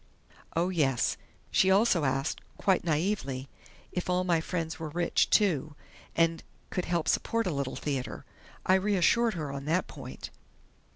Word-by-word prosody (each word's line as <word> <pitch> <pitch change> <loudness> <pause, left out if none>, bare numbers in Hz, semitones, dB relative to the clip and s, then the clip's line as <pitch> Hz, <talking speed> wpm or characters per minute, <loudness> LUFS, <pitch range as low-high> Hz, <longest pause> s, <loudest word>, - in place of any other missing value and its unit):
Oh, 170 +2 +2
yes, 140 -9 +1 0.4
she 190 - +4
also 190 -5 +4
asked, 135 +2 -1 0.2
quite 190 -3 +2
naïvely, 155 -5 -1 0.5
if 180 0 -3
all 180 0 +2
my 170 -3 +2
friends 165 -1 -3
were 160 -1 -4
rich, 170 +3 +1
too, 155 - +2 0.4
and 165 -1 +2 0.3
could 180 - -1
help 170 -2 0
support 230 0 +1
a 180 - 0
Little 140 -2 -2
Theater. 135 -5 -3 0.4
I 185 - +4
reassured 210 +3 +3
her 150 -4 -3
on 140 0 -6
that 165 +4 +1
point." - - -9
165 Hz, 150 wpm, -29 LUFS, 145-185 Hz, 0.5 s, she